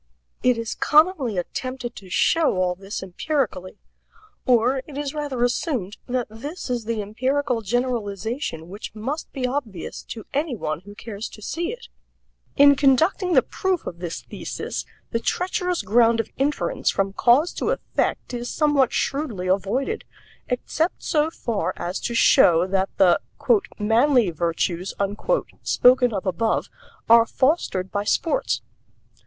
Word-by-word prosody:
It 250 -2 +3
is 230 -1 -3
commonly 300 - +3
attempted 255 +7 -4
to 190 -3 -11
show 325 - +3
all 180 -1 +1
this 195 +3 -6
empirically 190 - -2 0.7
or 250 +2 +3
it 285 -2 -9
is 290 -1 -3
rather 290 -5 -2
assumed 245 - -1
that 250 -1 -1
this 275 +7 -7
is 240 -3 -2
the 225 -2 -2
empirical 255 +3 -1
generalization 220 - -2
which 200 +4 -8
must 265 +9 -4
be 265 -3 -3
obvious 250 - -4
to 220 - -8
any 290 -1 0
one 155 -7 -3
who 205 +3 -13
cares 215 0 -6
to 215 - -13
see 340 - -2
it. 475 0 -9 0.7
In 285 0 +8
conducting 320 +7 +3
the - - +6
proof 375 -3 -2
of 170 - -6
this 175 -2 -5
thesis - - -5 0.3
the 230 - 0
treacherous 360 - -1
ground 230 +3 +4
of 225 - -2
inference 285 +2 0
from 195 0 0
cause 260 - +4
to - - -2
effect - - -1
is 240 0 -4
somewhat 295 -5 +2
shrewdly 270 -11 -2
avoided, 200 - 0 0.4
except 315 +7 -1
so 305 -1 +2
far 235 -9 -2
as 180 +2 -3
to 235 - -3
show 170 -6 +5
that 190 0 0
the 180 -3 +5 0.6
"manly 230 0 +3
virtues" 170 +2 -2 0.7
spoken 250 0 +4
of 195 -3 -3
above 195 +4 0 0.4
are 230 0 +7
fostered 260 - 0
by 205 0 -1
sports. 330 - 0
240 Hz, 140 wpm, -23 LUFS, 200-285 Hz, 0.7 s, In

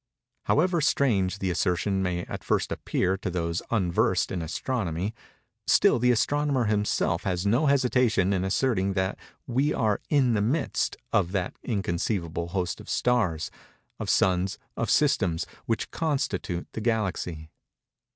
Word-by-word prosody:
However 175 +2 +2
strange 100 - +2
the 95 -2 -1
assertion 90 +3 0
may 90 -2 -1
at - - -7
first - - 0
appear 95 +1 0
to 95 - -4
those 85 -1 -2
unversed 95 -7 +1
in 90 - -2
Astronomy, 90 +2 -2 0.5
still - - +5
the 125 +1 +3
astronomer 140 +2 +2
himself 105 -5 +1
has 90 -1 -2
no 120 +9 +3
hesitation 125 -8 +3
in 95 -1 0
asserting 100 -1 +1
that 95 0 -1 0.3
we 135 +5 +1
are 105 -3 +1
in 135 -5 +3
the 105 - +1
midst 135 +9 0 0.2
of 95 -2 +2
that 95 -2 -1
inconceivable 85 -5 -2
host 90 0 -2
of - - -13
stars—of 95 -11 -2
suns—of 95 0 0
systems—which 110 - 0
constitute 135 - -2
the 110 - -4
Galaxy. 95 -8 -2
100 Hz, 130 wpm, -27 LUFS, 90-125 Hz, 0.5 s, still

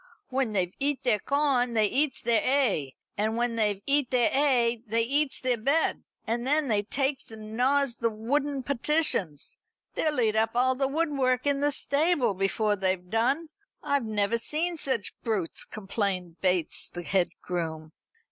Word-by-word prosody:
"When 260 -4 -1
they've 185 -2 0
eat 285 0 -1
their 235 -5 +2
corn 265 -2 +1
they 215 -1 +4
eats 275 +6 0
their 235 -2 +3
'ay, 230 - +1 0.3
and 220 +2 0
when 240 -1 0
they've 210 -3 0
eat 280 -2 +1
their 245 -2 +2
'ay 245 -5 +2
they 225 +2 +1
eats 280 +4 +1
their 250 -2 0
bed, 280 +8 +1 0.2
and 235 +2 -2
then 295 -1 +2
they 210 -2 +2
takes 270 +5 -1
and 215 -1 -8
gnaws 265 +1 +2
the 230 - +1
wooden 270 +5 -2
partitions. 275 - 0 0.4
They'll 305 -4 0
eat 220 -2 +2
up 225 +1 +1
all 255 +1 +3
the 270 +1 0
woodwork 275 -4 0
in 285 -1 +1
the 290 +1 +2
stable, 285 - +2
before 200 +2 0
they've 185 -2 -2
done. 270 +9 +1 0.3
I 280 - +1
never 220 -1 0
see 325 +8 0
such 260 -9 -1
brutes," 210 -8 -2
complained 195 -4 -3
Bates, 180 -3 +1
the 175 - -7
head 185 +1 +1
groom. 160 -3 -4
235 Hz, 165 wpm, -27 LUFS, 210-280 Hz, 0.4 s, they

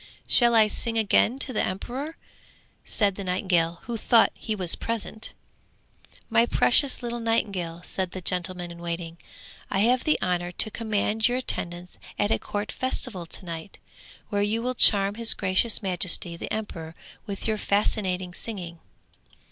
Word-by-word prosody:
'Shall 240 -1 +6
I 220 -1 +7
sing 225 +2 -2
again 225 +3 +3
to 275 -1 -1
the 215 - +1
emperor?' 260 - -4 0.7
said 205 -3 +2
the 200 - -6
nightingale, 180 -2 0
who 235 -1 -4
thought 230 +1 +4
he 220 - -4
was 180 -4 0
present. 220 -1 -4 0.9
'My 230 +1 +3
precious 265 +2 +3
little 240 0 -3
nightingale,' 195 -7 -1
said 185 0 -1
the 185 - -7
gentleman 180 0 -1
in 170 - -10
waiting, 170 -1 -5 0.5
'I 195 - 0
have 245 +3 +3
the 310 - +2
honour 175 -1 -1
to 215 - +3
command 220 0 0
your 245 +1 0
attendance 175 -8 -3 0.2
at 205 +1 +1
a - - +2
court 205 0 -4
festival 250 -8 -3
to 185 - -8
night, 165 +2 -7 0.5
where 205 -2 0
you 215 +3 0
will 250 +1 0
charm 200 -4 +4
his 230 - +3
gracious 200 +4 +2
majesty 180 -2 +1
the - - -7
emperor 165 -7 -5 0.3
with 200 +1 -4
your 215 -1 0
fascinating 190 -3 0
singing.' 180 -6 -6
200 Hz, 155 wpm, -26 LUFS, 180-230 Hz, 0.9 s, I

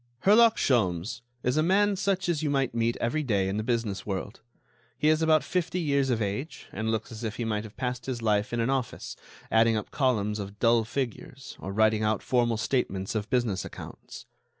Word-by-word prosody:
Herlock 225 +3 +6
Sholmes 110 -2 +1 0.2
is 125 +4 +1
a - - +4
man 200 +4 +3
such 190 -1 0
as 165 -4 0
you 155 - 0
might 135 -3 0
meet 115 0 0
every 145 +7 0
day 100 -9 +1
in 95 +2 -2
the 110 - -1
business 115 -4 -1
world. 100 +3 -5 0.6
He 150 - +3
is 155 0 +3
about 160 -1 +4
fifty 180 0 -1
years 140 -4 +1
of 115 -3 +1
age, 105 +11 -4
and 110 +2 -3
looks 110 +1 -2
as 115 +1 -8
if 110 -1 -3
he 120 - -3
might 105 -1 -1
have 110 -2 -12
passed 125 -1 -3
his 130 -3 -2
life 105 -2 +1
in 120 - -1
an 115 +3 +1
office, 130 -3 -3 0.4
adding 115 0 +4
up 105 - -5
columns 110 -6 +1
of 100 0 -7
dull 115 0 +3
figures 130 +2 -5
or 95 - -5
writing 110 +1 +3
out 110 -1 0
formal 120 -3 +1
statements 100 -5 -1
of 110 -1 -3
business 120 -6 0
accounts. - - -10
115 Hz, 205 wpm, -27 LUFS, 110-140 Hz, 0.6 s, Herlock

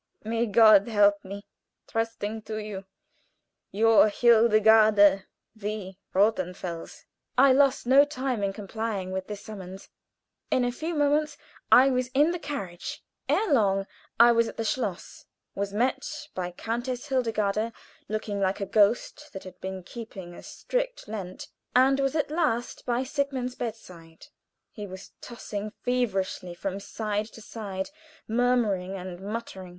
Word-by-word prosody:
May 230 +2 -1
God 215 -1 +6
help 205 -2 +3
me! 200 +1 -8 0.4
Trusting 225 -1 -3
to 215 - -3
you, 210 -3 -6 0.9
Your, 220 +1 +5
"HILDEGARDE 215 -3 +5 0.3
v. 205 -3 -6 0.2
ROTHENFELS." 185 -4 -1 0.3
I 265 +1 +7
lost 275 -1 +3
no 270 +3 +7
time 265 -5 -3
in 200 -1 0
complying 205 -1 -4
with 190 0 -4
this 205 -1 -6
summons. 190 -3 -9 0.6
In 250 - +2
a 245 - 0
few 320 +7 -4
moments 295 +1 +1 0.3
I 265 +2 +7
was 255 -1 0
in 295 +4 +4
the 355 - -3
carriage; 195 - -6 0.3
ere 425 -8 +2
long 195 -5 +2 0.3
I 235 +1 +8
was 230 -1 +3
at - - -8
the 225 - -1
schloss, 210 -6 -3 0.3
was 200 0 -3
met 255 +6 0 0.3
by 180 -1 -3
Countess 240 +8 -4
Hildegarde, 225 -4 0 0.4
looking 210 -1 -3
like 195 +1 0
a 200 - -2
ghost 220 +9 +1
that 190 - -7
had 185 - -12
been 190 -1 -5
keeping 195 -4 -9
a - - -11
strict - - -4
Lent, 195 -4 -6 0.3
and 265 +2 +5
was 275 +1 0
at 300 -2 0
last 285 -9 -1
by 245 +1 +1
Sigmund's 265 -2 -2
bedside. 180 -9 -8 0.5
He 210 -2 -7
was 190 0 -10
tossing 215 -3 -6
feverishly 195 -7 -1
from 195 +2 -4
side 210 +1 -3
to 225 - -11
side, 200 -1 -6 0.4
murmuring 220 -6 +1
and 180 -1 -7
muttering. 200 -3 -6
215 Hz, 140 wpm, -27 LUFS, 195-250 Hz, 0.9 s, I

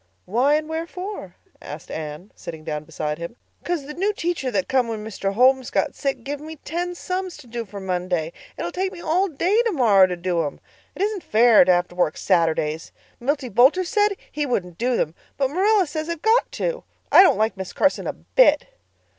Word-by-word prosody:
"Why 255 +9 +2
and 305 0 -1
wherefore?" 330 - -6 0.3
asked 150 +2 -9
Anne, 155 +5 -6
sitting 160 -2 -9
down 150 -1 -4
beside 150 -1 -4
him. 170 +7 -6 0.3
"'Cause 345 -5 -2
the 300 - -7
new 390 +6 0
teacher 340 -8 -2
that 200 -6 -1
come 260 -2 +2
when 220 -2 -5
Mr. 195 -2 -3
Holmes 260 +2 +4
got - - 0
sick 275 -4 -3
give 285 +2 -4
me 315 +2 -8
ten 350 +4 -4
sums 365 0 -4
to 300 - -14
do 235 0 -5
for 200 0 -9
Monday. 180 -3 -2 0.2
It'll 175 - -3
take 380 0 -2
me 365 - -10
all 345 +4 +1
day 370 +7 +1
tomorrow 235 - +4
to 180 -1 -4
do 175 -1 0
them. 145 -3 -4 0.4
It - - -1
isn't 415 -2 -1
fair 225 - +5
to 185 - +4
have 175 0 +2
to 175 - -15
work 175 -3 +1
Saturdays. 160 -3 0 0.3
Milty 275 +1 -1
Boulter 260 - +4
said 415 +1 +1
he 300 - -2
wouldn't 180 - -2
do 245 +1 +1
them, 155 - -1 0.2
but 270 -1 0
Marilla 395 +4 +3
says 310 +1 -5
I've 335 -2 -4
got 450 +3 +3
to. - - -2 0.3
I - - +9
don't 380 - +5
like 220 0 +1
Miss 190 -1 -6
Carson 290 - +1
a - - -2
bit." - - +3
255 Hz, 205 wpm, -23 LUFS, -, 0.4 s, I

